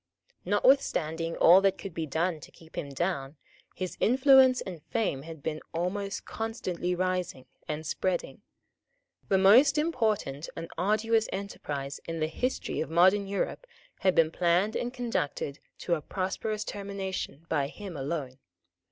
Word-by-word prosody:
Notwithstanding 170 Hz, -, +2 dB
all 180 Hz, +3 st, +7 dB
that 195 Hz, -1 st, +2 dB
could 195 Hz, -4 st, -7 dB
be 160 Hz, -1 st, -3 dB
done 160 Hz, +2 st, 0 dB
to -, -, -12 dB
keep 160 Hz, -1 st, -18 dB
him 140 Hz, -, -4 dB
down, 140 Hz, -1 st, -2 dB, 0.4 s
his 185 Hz, -1 st, -4 dB
influence 260 Hz, +1 st, +6 dB
and 175 Hz, -5 st, -7 dB
fame 205 Hz, -, -1 dB
had 160 Hz, -1 st, -10 dB
been 155 Hz, -1 st, -3 dB
almost 195 Hz, +4 st, -2 dB
constantly 185 Hz, -6 st, -3 dB
rising 180 Hz, -7 st, -2 dB, 0.2 s
and 155 Hz, +1 st, -4 dB
spreading. 180 Hz, +3 st, -2 dB, 0.9 s
The 195 Hz, -, +4 dB
most 245 Hz, +10 st, +6 dB
important 220 Hz, -, 0 dB
and 165 Hz, 0 st, -7 dB
arduous 215 Hz, +4 st, +1 dB
enterprise 145 Hz, -8 st, -5 dB
in 165 Hz, 0 st, -3 dB
the 155 Hz, -, +1 dB
history 250 Hz, +12 st, -2 dB
of 160 Hz, -, -3 dB
modern 185 Hz, +5 st, +4 dB
Europe 200 Hz, -, -3 dB, 0.3 s
had 185 Hz, -2 st, +2 dB
been 160 Hz, -1 st, +4 dB
planned 180 Hz, +5 st, +2 dB
and 245 Hz, -, -2 dB
conducted 225 Hz, -, -3 dB, 0.2 s
to 175 Hz, -, -1 dB
a 160 Hz, -, 0 dB
prosperous 200 Hz, +5 st, -3 dB
termination 195 Hz, -7 st, -5 dB
by 145 Hz, -4 st, 0 dB
him 190 Hz, +3 st, -8 dB
alone. 135 Hz, -2 st, -4 dB
185 Hz, 145 wpm, -29 LUFS, 160-205 Hz, 0.9 s, all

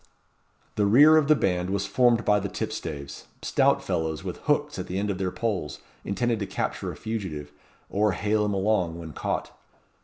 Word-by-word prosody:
The 105 Hz, -1 st, +3 dB
rear 145 Hz, +9 st, +7 dB
of 155 Hz, -3 st, +4 dB
the 155 Hz, -, +6 dB
band 90 Hz, -7 st, 0 dB
was 100 Hz, 0 st, -1 dB
formed 120 Hz, +2 st, +3 dB
by 105 Hz, 0 st, +4 dB
the 100 Hz, 0 st, -4 dB
tipstaves 80 Hz, -10 st, -5 dB, 0.2 s
stout -, -, +2 dB
fellows 80 Hz, -2 st, -2 dB
with -, -, -5 dB
hooks -, -, 0 dB
at -, -, -4 dB
the 90 Hz, -, -3 dB
end 100 Hz, +1 st, 0 dB
of 95 Hz, -, -4 dB
their 95 Hz, -1 st, 0 dB
poles, 95 Hz, -, -3 dB, 0.3 s
intended 115 Hz, +3 st, -1 dB
to 100 Hz, -, -3 dB
capture -, -, -3 dB
a -, -, -9 dB
fugitive, 95 Hz, -10 st, -5 dB, 0.4 s
or 105 Hz, 0 st, +1 dB
hale 105 Hz, +2 st, +1 dB
him 105 Hz, -1 st, 0 dB
along 95 Hz, -4 st, +1 dB
when 80 Hz, -3 st, -8 dB
caught. -, -, -3 dB
100 Hz, 185 wpm, -26 LUFS, 90-110 Hz, 0.4 s, rear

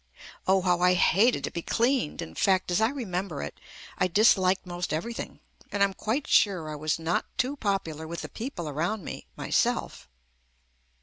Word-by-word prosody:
Oh 190 Hz, 0 st, +4 dB
how 180 Hz, -1 st, +2 dB
I 180 Hz, 0 st, +5 dB
hated 205 Hz, +7 st, +3 dB
to -, -, -2 dB
be 170 Hz, -, -4 dB
cleaned! 235 Hz, -, 0 dB
In 80 Hz, -, -10 dB
fact 185 Hz, -, +2 dB
as 175 Hz, -, +2 dB
I 220 Hz, -, +4 dB
remember 195 Hz, -, -3 dB
it, 75 Hz, -, -7 dB, 0.4 s
I -, -, +3 dB
disliked 190 Hz, -1 st, +4 dB
most 175 Hz, 0 st, -4 dB
everything, 230 Hz, +10 st, -4 dB, 0.3 s
and 200 Hz, -1 st, +2 dB
I -, -, +8 dB
am 195 Hz, -, -3 dB
quite 235 Hz, +9 st, -2 dB
sure 180 Hz, -7 st, +3 dB
I -, -, -4 dB
was 155 Hz, 0 st, -1 dB
not 165 Hz, +2 st, -1 dB
too 260 Hz, +3 st, 0 dB
popular 195 Hz, -, -2 dB
with 170 Hz, +1 st, -5 dB
the -, -, -4 dB
people 220 Hz, -, -5 dB
around 170 Hz, +8 st, -2 dB
me -, -, -7 dB
myself. -, -, -1 dB
185 Hz, 180 wpm, -27 LUFS, 170-215 Hz, 0.4 s, I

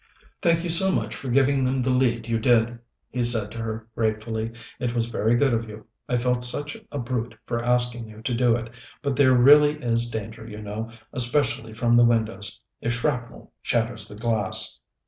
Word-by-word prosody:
"Thank 165 Hz, -1 st, +2 dB
you 175 Hz, -, -1 dB
so 190 Hz, +3 st, +3 dB
much -, -, -1 dB
for 135 Hz, -, -6 dB
giving 135 Hz, +2 st, +3 dB
them 130 Hz, +1 st, +1 dB
the 130 Hz, +1 st, +1 dB
lead 120 Hz, -3 st, +1 dB
you 115 Hz, -1 st, 0 dB
did," 120 Hz, 0 st, +2 dB, 0.3 s
he 125 Hz, -, -2 dB
said 115 Hz, -4 st, +3 dB
to 115 Hz, -, -7 dB
her 110 Hz, 0 st, -5 dB
gratefully. 110 Hz, 0 st, -2 dB, 0.3 s
"It 120 Hz, -2 st, -2 dB
was 115 Hz, -1 st, +1 dB
very 115 Hz, 0 st, +1 dB
good 135 Hz, 0 st, +3 dB
of 115 Hz, -1 st, -1 dB
you. 105 Hz, 0 st, -10 dB, 0.2 s
I 125 Hz, -, +2 dB
felt 125 Hz, 0 st, 0 dB
such 145 Hz, +4 st, +1 dB, 0.2 s
a 145 Hz, -, -3 dB
brute 120 Hz, -2 st, -3 dB
for 120 Hz, -1 st, -2 dB
asking 120 Hz, -1 st, 0 dB
you 110 Hz, 0 st, -13 dB
to 125 Hz, -, -1 dB
do 120 Hz, -1 st, +3 dB
it; 115 Hz, -1 st, -5 dB, 0.3 s
but 140 Hz, -2 st, 0 dB
there 130 Hz, -2 st, +5 dB
really 145 Hz, +4 st, +7 dB
is 120 Hz, -2 st, +1 dB
danger, 110 Hz, 0 st, -6 dB
you 105 Hz, -1 st, -8 dB
know, 105 Hz, +2 st, -5 dB, 0.2 s
especially 125 Hz, -2 st, 0 dB
from 120 Hz, +1 st, +1 dB
the 120 Hz, 0 st, +7 dB
windows, 115 Hz, -3 st, 0 dB, 0.2 s
if 115 Hz, -, 0 dB
shrapnel 120 Hz, 0 st, -3 dB
shatters -, -, -1 dB
the 105 Hz, -, -10 dB
glass." 110 Hz, -3 st, -1 dB
120 Hz, 195 wpm, -24 LUFS, 115-125 Hz, 0.3 s, really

